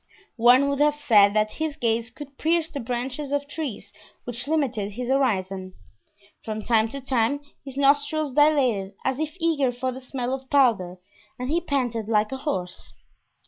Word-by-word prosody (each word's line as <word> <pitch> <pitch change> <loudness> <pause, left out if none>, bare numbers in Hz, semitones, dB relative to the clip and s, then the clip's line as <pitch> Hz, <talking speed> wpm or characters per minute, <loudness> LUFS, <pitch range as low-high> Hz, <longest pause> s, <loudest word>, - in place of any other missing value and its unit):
One 250 +4 +6
would 280 0 -1
have 295 0 +4
said 210 -8 +4
that 215 0 +2
his 315 -2 -1
gaze 230 0 0
could 280 +2 -12
pierce 325 0 +1
the 285 - -4
branches 255 +4 -4
of 285 0 -1
trees 270 - -6 0.3
which 245 +1 -5
limited 250 -10 -1
his 245 +3 -5
horizon. 190 -8 0 0.7
From 215 -1 -4
time 225 -1 +2
to 275 - -5
time 260 +1 +1 0.2
his 270 -1 -9
nostrils 285 +1 +2
dilated 255 -10 +2
as 265 +1 0
if 310 +2 -3
eager 310 -6 +1
for 255 +1 -3
the 260 +1 -8
smell 255 -1 -3
of 265 -1 -6
powder, 220 -10 +2 0.4
and 250 +2 -4
he 340 +2 +2
panted 245 -8 -2
like 210 0 +2
a 265 - -3
horse. 185 - -4
255 Hz, 170 wpm, -24 LUFS, 225-285 Hz, 0.7 s, One